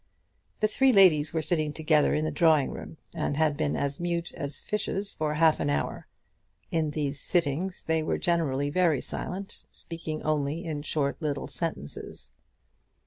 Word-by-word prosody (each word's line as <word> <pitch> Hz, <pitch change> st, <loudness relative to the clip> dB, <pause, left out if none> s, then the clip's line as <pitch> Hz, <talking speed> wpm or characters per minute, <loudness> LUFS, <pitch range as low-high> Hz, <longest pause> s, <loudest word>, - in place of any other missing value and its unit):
The 215 Hz, -, +3 dB
three 265 Hz, +5 st, +4 dB
ladies 175 Hz, -8 st, +6 dB
were 160 Hz, -1 st, -1 dB
sitting 155 Hz, -3 st, 0 dB
together 155 Hz, -1 st, +3 dB
in 155 Hz, +1 st, 0 dB
the 155 Hz, -, -1 dB
drawing 155 Hz, -2 st, +4 dB
room, 160 Hz, -, -8 dB, 0.2 s
and 145 Hz, -, -1 dB
had 155 Hz, -2 st, +2 dB
been 150 Hz, -1 st, 0 dB
as 140 Hz, 0 st, -2 dB
mute 170 Hz, 0 st, -2 dB
as 140 Hz, 0 st, -4 dB
fishes 205 Hz, -1 st, -2 dB
for 155 Hz, -1 st, -1 dB
half 160 Hz, 0 st, +4 dB
an 145 Hz, -, 0 dB
hour. 145 Hz, -, -2 dB, 0.6 s
In 160 Hz, -2 st, +1 dB
these 145 Hz, -1 st, -2 dB
sittings 175 Hz, +4 st, -1 dB
they 160 Hz, 0 st, +1 dB
were 155 Hz, -, 0 dB
generally 145 Hz, -5 st, 0 dB
very 165 Hz, -5 st, +3 dB
silent, 195 Hz, +2 st, -6 dB
speaking 160 Hz, -2 st, -6 dB
only 155 Hz, +2 st, -1 dB
in 155 Hz, -3 st, -3 dB
short 145 Hz, 0 st, -1 dB
little 145 Hz, -3 st, -2 dB
sentences. 75 Hz, -, -5 dB
155 Hz, 160 wpm, -28 LUFS, 145-170 Hz, 0.6 s, ladies